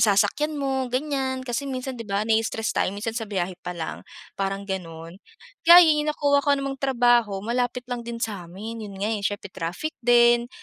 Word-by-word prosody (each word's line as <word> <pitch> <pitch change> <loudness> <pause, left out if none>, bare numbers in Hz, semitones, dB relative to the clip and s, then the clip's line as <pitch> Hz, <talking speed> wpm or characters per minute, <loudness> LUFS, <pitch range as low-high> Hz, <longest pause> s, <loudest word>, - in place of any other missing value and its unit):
sasakyan 295 +9 +2
mo 265 -2 -1
ganyan, 260 -1 -2
kasi 255 +3 -3
minsan 255 -1 -5
di 230 - -5
ba 200 +2 0
na 225 - +1
stress 225 0 -2
tayo 200 - -1
minsan 225 +2 -3
sa 225 -2 -4
biyahe 185 -3 -3
pa 180 -1 -6
lang, 160 - -5 0.4
parang 195 +1 -2
ganun. 170 -1 -7 0.5
Kaya 350 +1 +11
yun 300 -1 +2
nakuha 285 -1 +2
ko 285 0 +2
namang 275 -1 -4
trabaho 240 -6 +2
malapit 245 +1 -1
lang 245 -1 -4
din 235 0 -6
sa'min 210 +1 -5
yun 195 - -10
nga 205 +3 -1
eh, 210 - -2
siyempre 200 -1 -3
traffic 175 - -4
din, 240 0 +4
235 Hz, 185 wpm, -24 LUFS, 200-265 Hz, 0.5 s, Kaya